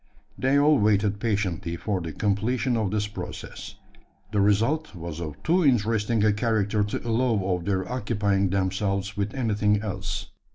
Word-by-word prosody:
They 135 Hz, +2 st, +2 dB
all 145 Hz, 0 st, +5 dB
waited 105 Hz, -1 st, +2 dB
patiently 100 Hz, -6 st, -1 dB
for 95 Hz, +1 st, -2 dB
the 80 Hz, -1 st, -5 dB
completion 110 Hz, -, 0 dB
of 110 Hz, -4 st, 0 dB
this 105 Hz, +1 st, 0 dB
process. 105 Hz, -, -7 dB, 0.6 s
The 105 Hz, -2 st, +2 dB
result 110 Hz, +7 st, +1 dB
was 85 Hz, -2 st, -6 dB
of 75 Hz, -3 st, -7 dB
too 175 Hz, +3 st, +3 dB
interesting 115 Hz, -4 st, +2 dB
a 105 Hz, -, +4 dB
character 105 Hz, -1 st, +1 dB
to 105 Hz, +3 st, -4 dB
allow 115 Hz, -1 st, +2 dB, 0.2 s
of 85 Hz, -1 st, -6 dB
their 95 Hz, -2 st, 0 dB
occupying 100 Hz, -5 st, 0 dB
themselves 100 Hz, +1 st, -1 dB
with 105 Hz, +2 st, -2 dB
anything 105 Hz, -4 st, +1 dB
else. 100 Hz, 0 st, -4 dB
105 Hz, 155 wpm, -26 LUFS, 100-115 Hz, 0.6 s, all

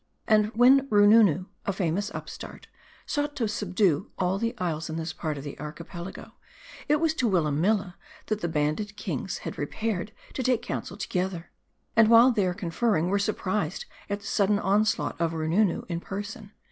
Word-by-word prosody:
And 215 Hz, -1 st, +4 dB
when 265 Hz, +3 st, +6 dB
Roonoonoo, 205 Hz, -4 st, +5 dB, 0.2 s
a -, -, +3 dB
famous 195 Hz, +2 st, -1 dB
upstart, -, -, -8 dB, 0.4 s
sought 290 Hz, 0 st, -2 dB
to 230 Hz, -, 0 dB
subdue 195 Hz, -5 st, 0 dB
all 185 Hz, +1 st, 0 dB
the 230 Hz, +1 st, -1 dB
isles 165 Hz, -3 st, -2 dB
in 160 Hz, -, -4 dB
this 160 Hz, 0 st, -3 dB
part 155 Hz, -2 st, -3 dB
of 140 Hz, -, -7 dB
the 145 Hz, -, -8 dB
Archipelago, 170 Hz, +4 st, -8 dB, 0.6 s
it 295 Hz, -, +4 dB
was 325 Hz, -1 st, +2 dB
to 250 Hz, -7 st, +1 dB
Willamilla 180 Hz, +3 st, +1 dB, 0.3 s
that 215 Hz, 0 st, -2 dB
the -, -, 0 dB
banded 160 Hz, +7 st, -1 dB
kings -, -, -3 dB
had -, -, -5 dB
repaired 215 Hz, -2 st, -2 dB, 0.2 s
to -, -, -3 dB
take 255 Hz, -2 st, +1 dB
counsel 185 Hz, -, -5 dB
together; 180 Hz, -4 st, -3 dB, 0.4 s
and 225 Hz, -1 st, +6 dB
while 235 Hz, +3 st, +8 dB
there 190 Hz, -6 st, 0 dB
conferring, 180 Hz, -2 st, 0 dB
were 200 Hz, +1 st, +2 dB
surprised 195 Hz, -4 st, -1 dB, 0.2 s
at 205 Hz, 0 st, -2 dB
the -, -, -14 dB
sudden 200 Hz, 0 st, +2 dB
onslaught 205 Hz, -2 st, +1 dB
of 165 Hz, -1 st, +1 dB
Roo 160 Hz, -1 st, -2 dB
noonoo 185 Hz, +2 st, +2 dB
in 170 Hz, -1 st, -3 dB
person. 205 Hz, +3 st, -7 dB
200 Hz, 170 wpm, -27 LUFS, 170-215 Hz, 0.6 s, while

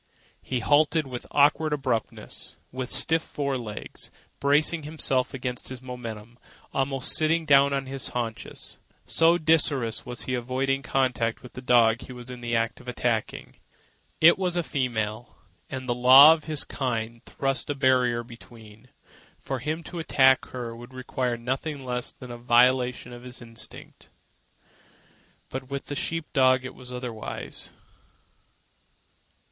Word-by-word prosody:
He 125 Hz, -2 st, -3 dB
halted 150 Hz, +4 st, +3 dB
with 125 Hz, -2 st, -7 dB
awkward 150 Hz, +2 st, +3 dB
abruptness, 130 Hz, -6 st, -3 dB
with 130 Hz, 0 st, -4 dB
stiff 160 Hz, 0 st, +6 dB
fore 140 Hz, -3 st, -3 dB
legs 115 Hz, -5 st, -6 dB, 0.3 s
bracing 150 Hz, +4 st, +2 dB
himself 140 Hz, -4 st, -1 dB
against 125 Hz, -2 st, -5 dB
his 130 Hz, -1 st, -7 dB
momentum, 120 Hz, -2 st, -8 dB, 0.3 s
almost 135 Hz, -1 st, +1 dB
sitting 160 Hz, +1 st, +2 dB
down 140 Hz, -1 st, +5 dB
on 135 Hz, -1 st, -1 dB
his 135 Hz, 0 st, -4 dB
haunches, 115 Hz, -2 st, -5 dB, 0.3 s
so 165 Hz, +1 st, +4 dB
desirous 145 Hz, -8 st, +1 dB
was 125 Hz, 0 st, -2 dB
he 130 Hz, -, -3 dB
of 120 Hz, -1 st, -2 dB
avoiding 135 Hz, +2 st, 0 dB
contact 125 Hz, -3 st, -1 dB
with 125 Hz, -, -12 dB
the 125 Hz, -, -8 dB
dog 120 Hz, -2 st, +4 dB
he 130 Hz, -, -9 dB
was 125 Hz, 0 st, -9 dB
in 125 Hz, -1 st, -9 dB
the 120 Hz, -1 st, -2 dB
act 115 Hz, 0 st, -1 dB
of 125 Hz, -, -9 dB
attacking. 120 Hz, -3 st, -2 dB, 0.6 s
It 170 Hz, +3 st, +6 dB
was 180 Hz, -2 st, 0 dB
a 175 Hz, -, +1 dB
female, 120 Hz, -5 st, -3 dB, 0.3 s
and 130 Hz, -1 st, -6 dB
the 120 Hz, -, +1 dB
law 130 Hz, +5 st, +9 dB
of 155 Hz, -2 st, -6 dB
his 155 Hz, -2 st, +3 dB
kind 115 Hz, -3 st, -3 dB
thrust 135 Hz, -1 st, -2 dB
a 145 Hz, -, -1 dB
barrier 125 Hz, -3 st, +2 dB
between. 115 Hz, -1 st, -15 dB, 0.5 s
For 135 Hz, -1 st, -5 dB
him 155 Hz, +6 st, -3 dB
to 175 Hz, -, -7 dB
attack 135 Hz, -4 st, +4 dB
her 120 Hz, -2 st, -6 dB
would 120 Hz, +2 st, -12 dB
require 125 Hz, -1 st, -2 dB
nothing 135 Hz, +4 st, -4 dB
less 125 Hz, -1 st, -4 dB
than 125 Hz, -1 st, -11 dB
a 120 Hz, -, -8 dB
violation 125 Hz, +1 st, +2 dB
of 120 Hz, -, -10 dB
his 125 Hz, 0 st, -9 dB
instinct. 115 Hz, -1 st, -10 dB, 1.4 s
But 130 Hz, 0 st, -6 dB
with 140 Hz, 0 st, -5 dB
the 145 Hz, -, -5 dB
sheep 165 Hz, +3 st, -3 dB
dog 130 Hz, -2 st, +4 dB
it 130 Hz, -, -6 dB
was 125 Hz, 0 st, -11 dB
otherwise. 125 Hz, -3 st, -6 dB
130 Hz, 150 wpm, -26 LUFS, 120-140 Hz, 1.4 s, law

